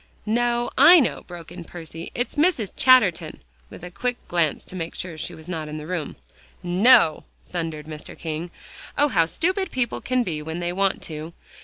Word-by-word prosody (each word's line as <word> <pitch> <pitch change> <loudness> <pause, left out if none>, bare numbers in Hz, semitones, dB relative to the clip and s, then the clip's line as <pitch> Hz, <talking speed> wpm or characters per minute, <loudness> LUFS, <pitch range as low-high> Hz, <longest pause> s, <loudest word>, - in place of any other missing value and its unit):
"No, 240 +2 +1
I 335 +6 +9
know," 260 - 0
broke 175 -2 -10
in - - -8
Percy, 165 -1 -9
"it's 245 - -2
Mrs. 295 - +1
Chatterton," 255 - +4 0.3
with - - -12
a 180 - -7
quick 245 +6 -2
glance 170 -4 0
to - - -11
make 165 -2 -5
sure 180 - -5
that 160 - -10
she - - -5
was 160 +1 -14
not 160 -4 -4
in 150 0 -6
the 150 - -7
room. 170 -2 -4 0.5
"NO!" 180 0 +5 0.2
thundered 165 -4 -4
Mr. 155 -1 -9
King. 160 +1 -4 0.5
"Oh! 290 +1 +4
how 165 -8 +3
stupid 375 - -1
people 250 -3 -2
can 255 0 +1
be 160 -8 -3
when 160 +2 -5
they 175 0 -2
want 195 +1 0
to. 155 +1 -7
180 Hz, 190 wpm, -24 LUFS, 160-240 Hz, 0.5 s, I